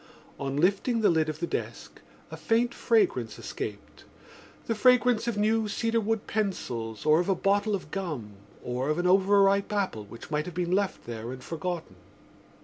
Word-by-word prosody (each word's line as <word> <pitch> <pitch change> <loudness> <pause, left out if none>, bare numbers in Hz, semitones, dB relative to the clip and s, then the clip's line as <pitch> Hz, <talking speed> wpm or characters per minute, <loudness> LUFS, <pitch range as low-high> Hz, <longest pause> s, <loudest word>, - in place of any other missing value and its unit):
On 140 0 -3
lifting 200 - +2
the 210 - +5
lid 160 -1 +1
of 155 0 -5
the 170 - -1
desk - - -5 0.3
a - - -5
faint 235 +1 +1
fragrance 410 -7 +1
escaped—the 230 - -8
fragrance 245 0 +4
of 235 -3 -1
new 220 +1 +2
cedarwood 225 0 0
pencils 120 - -3
or 155 +1 +5
of 180 - -1
a 195 - +3
bottle 200 +3 +1
of 190 - -8
gum 155 - -4 0.3
or 125 +3 -2
of 155 - +1
an 175 - -1
overripe 195 +2 +4
apple 190 - -1
which 115 +8 -12
might 150 +1 -1
have 180 - -7
been 175 -1 -1
left 195 0 0
there 115 0 -6
and 130 -1 -8
forgotten. 165 - -5
190 Hz, 165 wpm, -28 LUFS, 150-215 Hz, 0.3 s, the